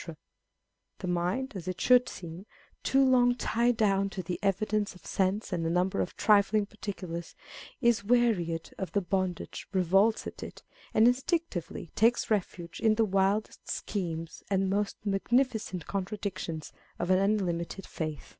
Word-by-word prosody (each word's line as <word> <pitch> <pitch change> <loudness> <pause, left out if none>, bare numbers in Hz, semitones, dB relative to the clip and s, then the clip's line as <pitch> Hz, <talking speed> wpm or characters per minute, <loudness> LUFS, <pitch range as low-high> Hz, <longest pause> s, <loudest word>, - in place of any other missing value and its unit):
The 185 - -6
mind 180 +10 -1
(as 185 -3 -6
it 185 0 -3
should 250 0 +5
seem), 175 +3 -9 0.3
too 270 0 +3
long 245 -1 +4
tied 235 0 +1
down 200 -3 +2
to 190 -1 -5
the 175 +1 -4
evidence 205 +1 0
of 180 - -17
sense 195 +2 0
and 170 -2 -1
a 165 - 0
number 180 +2 +1
of - - -4
trifling 205 0 +4
particulars, 190 -5 -6 0.5
is 235 -4 +3
wearied 200 -8 +1
of 190 - -4
the 200 - +2
bondage, 185 -1 -3
revolts 195 +4 +3
at - - -7
it, - - -9 0.3
and 220 +2 +6
instinctively 250 - -1
takes 230 +1 +2
refuge 175 -4 -2
in 220 -1 +3
the 225 0 +3
wildest 195 +2 0
schemes 165 -5 -4
and 195 -1 +1
most 205 0 0
magnificent 215 - 0
contradictions 190 -5 -4 0.2
of 175 - -1
an 185 - +5
unlimited 195 -2 -1
faith. 155 -2 -5
195 Hz, 145 wpm, -29 LUFS, 180-220 Hz, 0.5 s, and